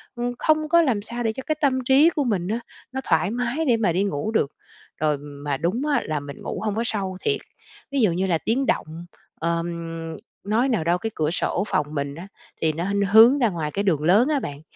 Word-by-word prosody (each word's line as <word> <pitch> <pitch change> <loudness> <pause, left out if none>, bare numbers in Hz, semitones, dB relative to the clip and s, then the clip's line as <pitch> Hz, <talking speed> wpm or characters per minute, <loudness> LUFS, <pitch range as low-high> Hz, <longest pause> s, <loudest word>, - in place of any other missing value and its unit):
ừm, 240 0 -2
không 310 -1 +2
có 340 +1 +6
làm 250 -10 +1
sao 235 +3 -5
để 225 -1 0
cho 265 - -7
cái 310 - 0
tâm 260 -3 +2
trí 275 +5 +6
của 305 -3 -1
mình 200 -8 -1
á, 220 +4 -1 0.3
nó 265 +1 -3
thoải 185 -3 +1
mái 245 +6 -1
để 240 -3 +4
mà 210 -6 +2
đi 185 +3 +1
ngủ 195 0 -2
được. 180 -11 +1 0.5
Rồi 150 -2 +2
mà 145 0 -5
đúng 180 - -1
á - - +2
là 155 -1 -1
mình 140 -1 -9
ngủ - - -4
hông 210 -2 -1
có 225 - 0
sâu 195 -5 -2
thiệt, 425 - 0 0.5
ví 275 -1 +1
dụ 210 -6 +4
như 185 +3 0
là 170 -3 +2
tiếng 240 +10 0
động, - - +1 0.5
ờm, 165 -1 -3 0.3
nói 225 +6 +1
nào 225 -10 +1
đâu 170 +2 +2
cái 225 +5 -3
cửa 155 0 0
sổ 180 - 0
phòng 150 - +1
mình 140 -1 -3
á, 170 +5 -9 0.3
thì 160 -1 +2
nó 175 +6 -2
nó 200 -1 +1
hướng 230 +6 +8
ra 235 -4 +3
ngoài 160 -5 -3
cái 200 - -1
đường 170 -7 +1
lớn 200 - +5
á 300 -2 +2
bạn. 145 - -6
200 Hz, 240 wpm, -23 LUFS, 165-245 Hz, 0.5 s, hướng